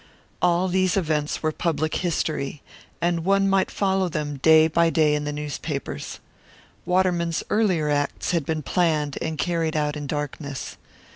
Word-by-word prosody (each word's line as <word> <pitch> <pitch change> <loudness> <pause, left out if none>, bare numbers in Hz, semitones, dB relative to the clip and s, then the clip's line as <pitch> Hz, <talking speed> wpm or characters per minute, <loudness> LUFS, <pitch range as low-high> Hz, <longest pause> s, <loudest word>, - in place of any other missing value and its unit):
All 175 +1 +3
these 185 0 +1
events 155 -5 -1
were 155 - +2
public 155 -1 -1
history, 155 -5 -2 0.4
and 170 -1 +1
one 195 +2 +3
might 195 -1 +2
follow 190 -2 0
them 150 -3 -3
day 160 +3 +6
by 165 +1 +3
day 155 -2 +3
in 150 0 -1
the 150 - -2
newspapers. 150 0 -5 0.7
Waterman's 180 -2 +1
earlier 185 -8 +2
acts 145 -1 -1
had 170 -3 +1
been 155 +1 -2
planned 155 -3 0
and 160 -1 -3
carried 165 -2 0
out 150 0 0
in 145 -1 -5
darkness. 145 -1 -5
160 Hz, 150 wpm, -24 LUFS, 150-175 Hz, 0.7 s, day